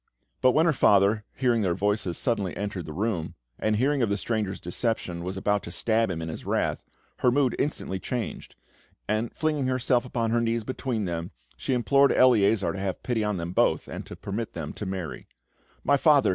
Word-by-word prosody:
But 130 -1 +5
when 160 - +4
her 165 - +4
father, 105 -2 +4
hearing 120 -3 +2
their 90 -4 +1
voices, 100 -2 0
suddenly 105 -7 -1
entered 100 -4 -4
the - - -5
room, 95 -1 -2 0.2
and 110 0 +1
hearing 135 +5 +2
of 115 - +2
the 100 - +1
stranger's 105 -3 -2
deception, 90 -2 -2
was 95 +2 -4
about 105 +1 +1
to 85 - -8
stab 110 +3 +1
him 80 -3 -3
in - - -4
his 80 - -6
wrath, - - -1 0.3
her 125 - +3
mood 130 0 +2
instantly 115 -9 -2
changed; 115 -1 -5 0.5
and, 110 +2 0
flinging 150 -4 0
herself 130 -1 +2
upon 115 -3 -1
her 120 0 +2
knees 115 0 0
between 125 -3 -2
them, 85 -1 -3 0.3
she 130 - -1
implored 140 +3 +4
Eleazar 110 -5 +4
to 95 - -5
have 95 -1 -3
pity 120 -3 0
on 105 -2 -1
them 85 0 -4
both, - - +2
and - - -7
to - - -8
permit 105 +3 -4
them 80 -3 -5
to 105 - -6
marry. 90 -9 -5 0.6
"My 140 +1 +4
father! 145 -1 +5
110 Hz, 200 wpm, -26 LUFS, 95-125 Hz, 0.6 s, But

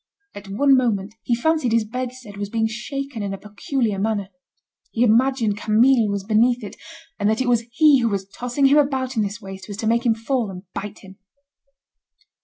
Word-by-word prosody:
At 205 0 -10
one 275 +7 +4
moment, 215 -5 0
he 240 - 0
fancied 310 0 +1
his 230 -1 +2
bedstead 250 -2 -6
was 205 0 -4
being 225 0 0
shaken 255 +2 -5
in 200 -1 -3
a - - -10
peculiar 210 +1 -2
manner. 205 -2 -1 0.6
He 230 - 0
imagined 235 -2 +2
Camille 225 +2 +3
was 200 -1 -2
beneath 230 +3 +2
it, 205 +1 -8 0.4
and 205 - +2
that 220 - +1
it 260 - 0
was 235 -2 +2
he 295 +1 +5
who 235 -2 +1
was 195 -2 -2
tossing 245 +6 -1
him 280 +2 +6
about 265 -2 0
in 220 - +1
this 205 +2 -3
way 195 0 -7
so 190 +2 -14
as 200 - -6
to 225 - -4
make 235 +2 +2
him 230 -2 +2
fall 230 0 -1
and 180 -1 -8
bite 205 +1 -7
him. 190 0 -14
225 Hz, 205 wpm, -22 LUFS, 205-255 Hz, 0.6 s, him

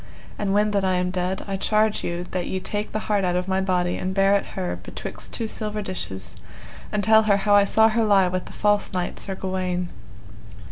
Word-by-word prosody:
And 205 -2 0
when 210 +1 +3
that 200 -1 +1
I 185 -1 +2
am 180 0 0
dead 185 +1 -2
I 195 -1 -3
charge 215 +2 +1
you 175 +1 -3
that 180 -1 -2
ye 190 - -2
take 205 +3 -4
the - - -1
heart 205 -2 +1
out 180 -1 +1
of 180 +1 -1
my 190 0 +1
body 180 -2 0
and 185 +1 -3
bear 195 0 +4
it 200 - 0
her 185 -2 -2
betwixt - - -8
two 230 - -3
silver 215 -1 -3
dishes, 95 - -5 0.5
and 210 -1 0
tell 220 +1 +6
her 200 - +5
how 205 +1 +2
I 205 -1 +6
saw 220 +2 +5
her 225 +1 +1
lie 200 -3 +4
with 185 0 -2
the - - -11
false 205 -1 +1
knight 180 -1 -3
Sir 195 - -4
Gawaine. 185 -2 -2
195 Hz, 225 wpm, -24 LUFS, 180-210 Hz, 0.5 s, tell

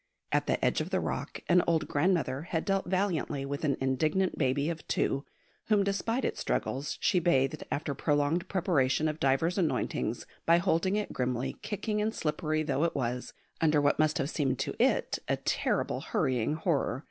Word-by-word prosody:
At - - +1
the - - +1
edge - - +2
of - - -4
the - - +1
rock - - -4
an 180 0 +5
old 165 -2 +2
grandmother 145 -4 +1
had 165 0 -3
dealt 195 -1 0
valiantly 175 -7 0
with 140 +2 -4
an 140 -3 +1
indignant 155 +8 +1
baby 140 +1 +1
of 165 -1 -4
two, 140 +1 0 0.4
whom, 210 -2 +4
despite 225 +6 -1
its - - -2
struggles, 135 +3 -2
she 185 - +3
bathed 135 -6 +1
after 145 0 -1
prolonged 145 +5 +1
preparation 155 -7 +1
of 155 0 -3
divers 160 +7 +2
anointings, 155 - -1 0.2
by 170 +1 +5
holding 185 +2 +1
it 210 0 -2
grimly, 125 +1 -2
kicking 210 0 -2
and 220 +2 -1
slippery 155 0 -1
though 150 0 0
it 170 - 0
was, 125 -1 -2 0.3
under 155 -2 +4
what 145 +1 +2
must 155 -1 +3
have 140 +2 -1
seemed 135 -4 0
to - - -2
it - - +1
a - - +2
terrible - - -1
hurrying 130 +3 0
horror. 155 -6 0
155 Hz, 180 wpm, -30 LUFS, 135-180 Hz, 0.4 s, an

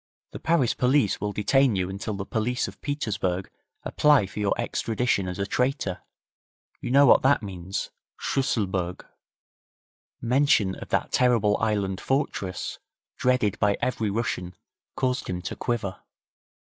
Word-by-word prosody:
The - - -7
Paris 160 -8 +2
police 125 -6 +2
will 105 0 -1
detain 125 +4 +3
you 90 -1 0
until 100 +3 -4
the 100 0 -4
police 115 +4 -1
of - - -11
Petersburg 100 -10 -2 0.3
apply 145 -8 +4
for 95 - -8
your 100 -1 0
extradition 115 -4 0
as 90 - -4
a 100 - -1
traitor. 125 -5 -1 0.8
You - - -5
know 140 +3 +6
what 125 - +6
that 135 -3 +3
means 95 -1 -5 0.3
Schusselburg.' 95 -9 -1 1.1
Mention 120 -5 +3
of - - -9
that - - 0
terrible 115 -5 +3
island 100 -4 -1
fortress, 100 -9 -2 0.4
dreaded 125 -6 +1
by 105 -2 +2
every 115 -4 -1
Russian, 95 -5 -2 0.4
caused 130 -1 -1
him 90 -1 -3
to - - -4
quiver. 105 -7 -3
105 Hz, 135 wpm, -26 LUFS, 95-125 Hz, 1.1 s, know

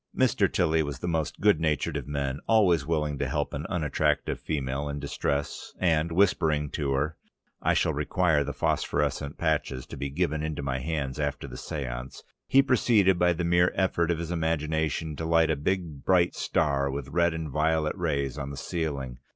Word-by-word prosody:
Mr. 110 -7 +3
Tilly 80 -3 +2
was 70 -3 -3
the 90 - -5
most 80 -3 -1
good 105 -6 +4
natured 75 -3 0
of - - -4
men, 70 -1 -2
always 90 -10 +4
willing 75 -3 -1
to - - -1
help - - -2
an 70 +2 -4
unattractive 75 -4 0
female 70 -1 -2
in 70 0 -4
distress, 70 0 -3
and 85 -2 +2
whispering 80 -5 +2
to 70 -3 -2
her, 75 +4 -1 0.4
"I - - +2
shall - - +2
require 80 -5 +1
the 70 - -4
phosphorescent 70 +1 -1
patches 75 -5 -1
to - - -9
be 70 - -3
given 80 +1 -1
into 75 -2 -3
my 65 -1 -1
hands 70 -2 -3
after 70 -2 -2
the 60 - -9
séance," 65 -2 -6 0.2
he 135 +1 +5
proceeded, 105 -8 +3
by 90 0 +4
the 85 +1 -3
mere 85 +1 +3
effort 85 -3 +1
of 85 - +1
his 85 +1 -4
imagination, 80 -1 -1
to - - -4
light 80 -1 +3
a - - +2
beautiful 80 -1 -2
big 90 -2 +4
star 70 -3 0
with 70 0 -4
red 85 +1 +2
and 80 -3 -4
violet 75 +1 +1
rays 70 -1 -1
on 70 -1 -4
the 70 - -7
ceiling. 70 -5 -3
75 Hz, 185 wpm, -27 LUFS, 70-85 Hz, 0.4 s, he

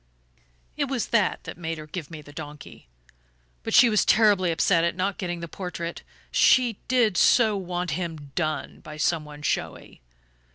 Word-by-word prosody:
It 290 - +1
was 265 -4 -3
that 210 -5 +1
that - - -9
made 165 -1 -4
her 155 - -8
give 155 0 -7
me 155 -2 -9
the 145 - -14
donkey. 150 - -10 0.7
But - - -2
she 245 - +8
was 215 -2 +3
terribly 205 -5 +4
upset 165 +1 +2
at 170 0 0
not 190 +2 -2
getting 175 -2 -4
the 170 - -5
portrait 170 -1 -6 0.3
she 245 -5 +4
did 235 -7 +2
so 220 -4 +4
want 180 -2 -3
him 160 -3 -5
'done' 155 -1 -3
by 150 0 -10
some 155 0 0
one 150 0 -11
showy! - - -3
175 Hz, 170 wpm, -25 LUFS, 155-200 Hz, 0.7 s, she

